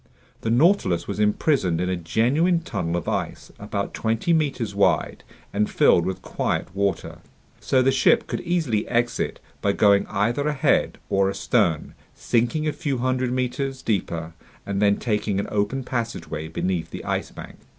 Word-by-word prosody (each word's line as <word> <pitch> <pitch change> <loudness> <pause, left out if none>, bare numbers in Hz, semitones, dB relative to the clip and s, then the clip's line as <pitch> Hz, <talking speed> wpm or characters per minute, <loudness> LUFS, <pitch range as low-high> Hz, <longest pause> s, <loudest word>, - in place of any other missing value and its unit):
The 115 - -2
Nautilus 120 - +3
was 100 0 -4
imprisoned 105 - +2
in 90 - 0
a 95 - 0
genuine 130 - +1
tunnel 85 - -2
of 85 - -5
ice - - -3
about 100 -1 -4
twenty 115 +9 0
meters 135 -9 0
wide 100 0 +1 0.3
and 105 +1 +1
filled 85 - +4
with 95 - -4
quiet 85 - -2
water. 100 0 -1 0.4
So 130 -1 +2
the 135 - +4
ship 220 - +3
could - - -4
easily 155 -12 0
exit 120 0 -1 0.2
by 100 - +2
going 100 -1 +4
either 120 +8 0
ahead 150 -3 +1
or 95 0 +2
astern, 100 -4 0 0.2
sinking 120 +7 0
a 150 - 0
few 140 -3 -2
hundred 130 0 0
meters 130 +1 -2
deeper, 85 -6 -2 0.3
and 100 0 -2
then 100 -1 +4
taking 105 -3 -1
an 100 - -2
open 105 +6 0
passageway 115 - -4
beneath 85 0 -2
the - - -8
Ice - - -2
Bank. - - -11
110 Hz, 160 wpm, -24 LUFS, 100-130 Hz, 0.4 s, filled